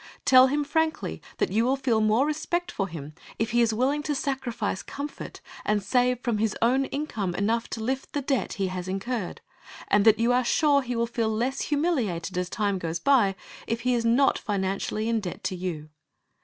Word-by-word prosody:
Tell 255 Hz, 0 st, +8 dB
him 290 Hz, +2 st, 0 dB
frankly 320 Hz, +2 st, -1 dB, 0.2 s
that -, -, 0 dB
you 220 Hz, +4 st, +2 dB
will 260 Hz, +3 st, +2 dB
feel 255 Hz, -5 st, +1 dB
more 215 Hz, +5 st, +3 dB
respect 345 Hz, +4 st, -2 dB
for 195 Hz, -, -2 dB
him 155 Hz, -4 st, -8 dB, 0.2 s
if 225 Hz, 0 st, -1 dB
he 240 Hz, +1 st, +3 dB
is 230 Hz, -1 st, +3 dB
willing 260 Hz, +6 st, +1 dB
to 295 Hz, -1 st, -2 dB
sacrifice 260 Hz, -8 st, -2 dB
comfort 285 Hz, +1 st, -7 dB, 0.2 s
and 210 Hz, -1 st, +1 dB
save 250 Hz, +4 st, +2 dB
from 235 Hz, -4 st, -1 dB
his 220 Hz, -1 st, 0 dB
own 255 Hz, +4 st, +3 dB
income 225 Hz, -, -3 dB
enough 225 Hz, +4 st, 0 dB
to 225 Hz, -, -4 dB
lift 265 Hz, +3 st, -3 dB
the 290 Hz, -, -1 dB
debt 270 Hz, -1 st, 0 dB
he 195 Hz, -4 st, -1 dB
has 185 Hz, 0 st, -5 dB
incurred, 195 Hz, +2 st, -3 dB, 0.5 s
and 205 Hz, -, +4 dB
that 220 Hz, -1 st, +7 dB
you 235 Hz, +2 st, +2 dB
are 250 Hz, +1 st, +3 dB
sure 285 Hz, +3 st, +3 dB
he 250 Hz, -2 st, -4 dB
will 235 Hz, 0 st, +1 dB
feel 230 Hz, -1 st, -1 dB
less 245 Hz, +5 st, -1 dB
humiliated 245 Hz, -, -1 dB
as 180 Hz, 0 st, -1 dB
time 200 Hz, -3 st, -1 dB
goes 165 Hz, -1 st, -3 dB
by 225 Hz, -5 st, +3 dB, 0.3 s
if 230 Hz, +1 st, -2 dB
he 250 Hz, +1 st, +1 dB
is 235 Hz, -1 st, +1 dB
not 240 Hz, +4 st, +3 dB
financially 200 Hz, +2 st, -2 dB
in 230 Hz, -1 st, +1 dB
debt 185 Hz, -5 st, -6 dB
to 185 Hz, -, -2 dB
you. 170 Hz, -4 st, -5 dB
230 Hz, 200 wpm, -26 LUFS, 200-270 Hz, 0.5 s, Tell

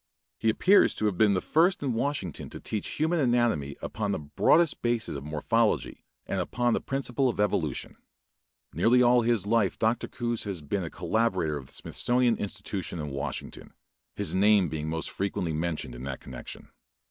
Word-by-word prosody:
He 115 Hz, -, +2 dB
appears 190 Hz, -, +4 dB
to 110 Hz, -, -2 dB
have 105 Hz, -3 st, +1 dB
been 100 Hz, +1 st, +4 dB
the 90 Hz, -, 0 dB
first 170 Hz, +2 st, +2 dB
in 130 Hz, -4 st, 0 dB
Washington 115 Hz, -, -2 dB
to -, -, -8 dB
teach 105 Hz, -, -3 dB
human 160 Hz, +3 st, +1 dB
anatomy 120 Hz, -, +1 dB
upon 105 Hz, -2 st, -2 dB
the -, -, 0 dB
broadest 145 Hz, -, +2 dB
basis 120 Hz, -8 st, -1 dB
of 70 Hz, -, -6 dB
morphology 75 Hz, 0 st, 0 dB, 0.2 s
and -, -, -2 dB
upon 120 Hz, -1 st, 0 dB
the -, -, 0 dB
principle 135 Hz, -1 st, -1 dB
of 115 Hz, -, -4 dB
evolution. 80 Hz, -9 st, -1 dB, 0.8 s
Nearly 120 Hz, +9 st, +4 dB
all 120 Hz, 0 st, +5 dB
his 115 Hz, -4 st, +1 dB
life 105 Hz, -3 st, +2 dB
Dr. 110 Hz, +2 st, 0 dB
Coues 120 Hz, -2 st, -3 dB
has 95 Hz, -6 st, -5 dB
been 95 Hz, +6 st, -2 dB
a 85 Hz, -, -4 dB
collaborator 95 Hz, -9 st, 0 dB
of 65 Hz, -3 st, -7 dB
the -, -, -18 dB
Smithsonian 120 Hz, -1 st, +1 dB
Institution 100 Hz, -3 st, -5 dB
of 75 Hz, -2 st, -4 dB
Washington, 70 Hz, 0 st, -6 dB, 0.4 s
his -, -, -2 dB
name 100 Hz, -2 st, +4 dB
being 75 Hz, 0 st, -3 dB
most 80 Hz, 0 st, -3 dB
frequently 95 Hz, -4 st, -2 dB
mentioned 80 Hz, -3 st, -3 dB
in -, -, -9 dB
that 70 Hz, -2 st, -5 dB
connection. 60 Hz, -1 st, -9 dB
105 Hz, 175 wpm, -28 LUFS, 80-120 Hz, 0.8 s, all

